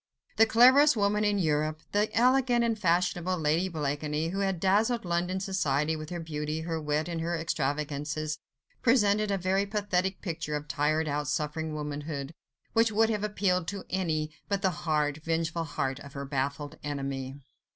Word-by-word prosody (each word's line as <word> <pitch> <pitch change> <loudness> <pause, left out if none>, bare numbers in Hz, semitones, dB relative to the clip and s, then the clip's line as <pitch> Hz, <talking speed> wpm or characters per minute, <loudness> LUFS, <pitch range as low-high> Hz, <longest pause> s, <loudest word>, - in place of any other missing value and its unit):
The 225 - +6
cleverest 260 +5 +6
woman 210 +1 +2
in 205 -1 +2
Europe, 155 -3 0
the 210 +1 +2
elegant 250 0 +4
and 230 -1 +1
fashionable 180 0 +1
Lady 160 +4 +1
Blakeney, 150 0 -2
who 195 +3 -3
had 195 -3 0
dazzled 215 +5 +2
London 175 +2 0
society 160 -6 0
with 155 0 -7
her 175 - -4
beauty, 155 -1 -3
her 165 -1 -3
wit 150 +1 -1
and 170 -2 -3
her 170 +1 -1
extravagances, 150 0 -2 0.4
presented 215 -3 +3
a 200 - +1
very 190 +2 +1
pathetic 195 -2 -1
picture 160 -4 -3
of 150 0 -4
tired 155 +2 +1
out, 145 0 -1
suffering 155 +2 -2
womanhood, 150 0 -4 0.4
which 225 0 +4
would 220 +1 +3
have 210 -1 -1
appealed 185 -4 0
to 200 -2 -5
any, 160 -5 -1 0.2
but 200 0 -1
the 190 - +3
hard, 155 -3 -1
vengeful 165 0 -1
heart 135 -2 -2
of 140 -1 -11
her 140 0 -5
baffled 140 +2 -3
enemy. 135 -2 -4
165 Hz, 165 wpm, -29 LUFS, 150-200 Hz, 0.4 s, The